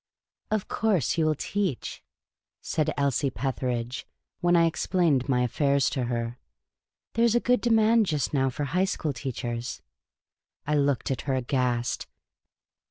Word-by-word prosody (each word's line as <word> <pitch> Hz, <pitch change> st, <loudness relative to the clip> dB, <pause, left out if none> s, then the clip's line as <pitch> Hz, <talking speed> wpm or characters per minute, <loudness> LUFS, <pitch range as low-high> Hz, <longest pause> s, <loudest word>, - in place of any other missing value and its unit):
" -, -, -67 dB
Of 215 Hz, -2 st, -1 dB
course 200 Hz, -, +1 dB
you 160 Hz, -, +3 dB
will 155 Hz, -, +2 dB
teach," 190 Hz, -3 st, -3 dB, 0.6 s
said 155 Hz, -2 st, -1 dB
Elsie 140 Hz, 0 st, +1 dB
Petheridge, 125 Hz, -1 st, -3 dB, 0.3 s
when 175 Hz, 0 st, +3 dB
I 170 Hz, -1 st, +5 dB
explained 160 Hz, -5 st, +1 dB
my 125 Hz, -2 st, +3 dB
affairs 140 Hz, +2 st, +2 dB
to 130 Hz, -3 st, -1 dB
her. 120 Hz, 0 st, -3 dB, 0.2 s
' -, -, -63 dB
' -, -, -66 dB
There 230 Hz, -, +2 dB
is 235 Hz, 0 st, +3 dB
a -, -, +5 dB
good 250 Hz, +1 st, +2 dB
demand 225 Hz, -2 st, +4 dB
just 150 Hz, -4 st, -1 dB
now 135 Hz, -2 st, +2 dB
for 130 Hz, +3 st, -4 dB
high 180 Hz, +7 st, +1 dB
school 160 Hz, -6 st, -2 dB
teachers." 120 Hz, -2 st, -4 dB, 0.8 s
I 150 Hz, -, 0 dB
looked 140 Hz, -3 st, +1 dB
at 130 Hz, -, -2 dB
her, 135 Hz, -, +2 dB
aghast. 125 Hz, -2 st, -1 dB
140 Hz, 160 wpm, -27 LUFS, 125-175 Hz, 0.8 s, I